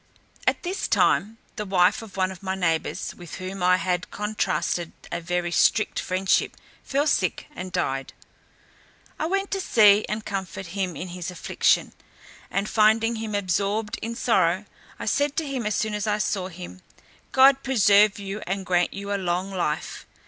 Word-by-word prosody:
At - - +2
this 375 +3 -2
time 220 +3 +2 0.2
the 210 - -2
wife 185 0 +3
of 220 -3 -11
one 185 0 +1
of 185 - -11
my 190 -1 -2
neighbours, 165 -4 -1
with 175 -2 -10
whom 185 +1 -6
I 180 0 +4
had 180 0 -2
contrasted 210 -4 -2 0.2
a 170 - -3
very 175 0 -2
strict 215 +4 +2
friendship, 185 +1 0 0.3
fell 280 +2 0
sick, - - 0
and 185 0 -6
died. 135 -5 -2 1.1
I 315 - 0
went 390 +2 -1
to 390 - -1
see 210 - +5
and 215 +1 -3
comfort 195 -1 -4
him 190 -4 -2
in 180 - -6
his 180 +1 -5
affliction, 180 - +1 0.6
and 200 +1 -1
finding 225 +2 +3
him 220 -1 -4
absorbed 205 +3 -1
in 230 +1 -4
sorrow, 190 -4 +2 0.3
I - - -6
said 285 -1 +1
to 320 - 0
him 260 -5 -2
as 210 - 0
soon 215 -1 -1
as 210 0 -2
I 210 0 +1
saw 200 -3 -1
him, 165 - -10 0.5
"God 270 +1 +6
preserve 210 -6 +4
you 200 +1 -5
and 195 +1 -2
grant 175 -1 +1
you 200 +1 -4
a 200 - -1
long 180 +2 -1
life." 175 -5 -3
195 Hz, 170 wpm, -25 LUFS, 180-215 Hz, 1.1 s, God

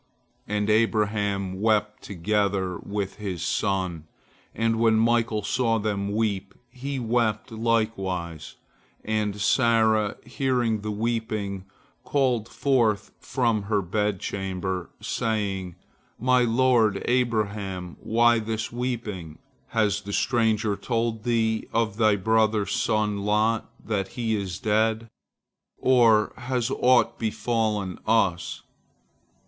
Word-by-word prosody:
And 105 0 -1
Abraham 105 -3 +1
wept 105 -1 +1
together 100 -1 -1
with 100 -1 -4
his 95 -6 -4
son, 90 -5 -1 0.5
and 115 0 +1
when 115 -1 +4
Michael 115 -1 +2
saw 115 +1 +1
them 100 -2 -2
weep, 100 -3 -1 0.2
he 135 +2 -5
wept 115 -2 0
likewise. 95 -8 -2 0.5
And 105 -2 -1
Sarah, 110 -1 +3
hearing 120 -5 0
the 105 - -4
weeping, 105 -3 -2 0.4
called 125 -5 0
forth 120 -5 +1
from 115 -4 0
her 105 -3 +2
bedchamber, 95 -2 -2
saying: 100 -5 -2 0.4
"My 125 +1 +3
lord 115 -4 +3
Abraham, 105 -7 -1
why 120 +1 +3
this 110 0 -3
weeping? 115 -10 -4 0.3
Has 105 -2 +1
the 100 0 -7
stranger 110 -4 +1
told 115 0 -2
thee 110 -2 +1
of 110 -2 0
thy 110 -2 +4
brother's 110 +1 +1
son 105 -2 0
Lot, 105 +2 +1 0.2
that 100 -3 -1
he 115 -2 0
is 95 -4 -3
dead? 110 +2 +1 0.7
or 115 -5 +4
has 125 0 -2
aught 125 -2 +3
befallen 110 -4 -1
us?" 95 -7 +1
110 Hz, 105 wpm, -25 LUFS, 100-115 Hz, 0.7 s, when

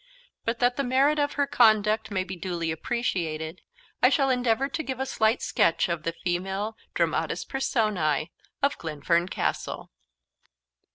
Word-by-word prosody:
But, 230 +1 0
that 245 +1 +2
the 280 - +1
merit 275 +4 +3
of 290 0 +1
her 285 - +1
conduct 220 -5 +3
may 190 -3 -1
be 185 0 -6
duly 170 -2 -3
appreciated, 160 -4 -2 0.4
I - - +7
shall 275 -3 +2
endeavour 250 +1 +1
to 300 +3 -3
give 265 -4 -5
a 265 - 0
slight 225 -2 +1
sketch 165 - +2
of 170 -2 -1
the 165 +1 -3
female 190 +5 -2 0.2
dramatis - - 0
personae 185 - 0 0.3
of 280 - +2
Glenfern 170 +2 0
Castle. - - -3
215 Hz, 150 wpm, -26 LUFS, 170-260 Hz, 0.4 s, I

